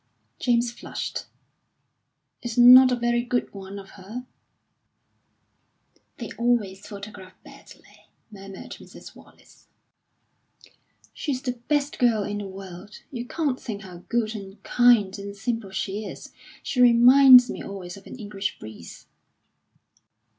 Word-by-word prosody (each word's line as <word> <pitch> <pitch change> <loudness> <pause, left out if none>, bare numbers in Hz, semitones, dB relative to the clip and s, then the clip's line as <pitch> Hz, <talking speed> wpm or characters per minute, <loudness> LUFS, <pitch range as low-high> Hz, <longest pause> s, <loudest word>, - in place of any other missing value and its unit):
James 240 -1 +1
flushed, 235 - -6 1.2
"It's 240 -1 -6
not 255 +1 +9
a - - +2
very 240 0 0
good 245 0 -2
one 195 0 -9
of 195 -1 -11
her." 230 +7 -8 1.9
"They 235 - -7
always 210 -5 0
photograph 200 -2 -10
badly," - - -17 0.2
murmured 195 -1 -11
Mrs. - - -13
Wallace. - - -20 1.5
"She's 265 -4 -4
the 255 - -1 0.2
best 290 -1 0
girl 230 -4 +3
in 205 +1 -4
the 205 - -6
world. 190 +1 -11
You 245 -2 -6
can't 285 -5 -2
think 215 -3 -6
how 180 -2 -11
good, 230 -2 0
and 195 -1 -10
kind, 225 -5 +3
and 200 0 -7
simple 225 0 -3
she 195 +2 -4
is; - - -10 0.3
she 250 - -1
reminds 250 +1 +8
me - - -7
always 185 -3 -8
of 200 - -14
an - - -9
English 205 -4 -5
breeze." 110 -6 -12
215 Hz, 125 wpm, -24 LUFS, 195-245 Hz, 1.9 s, not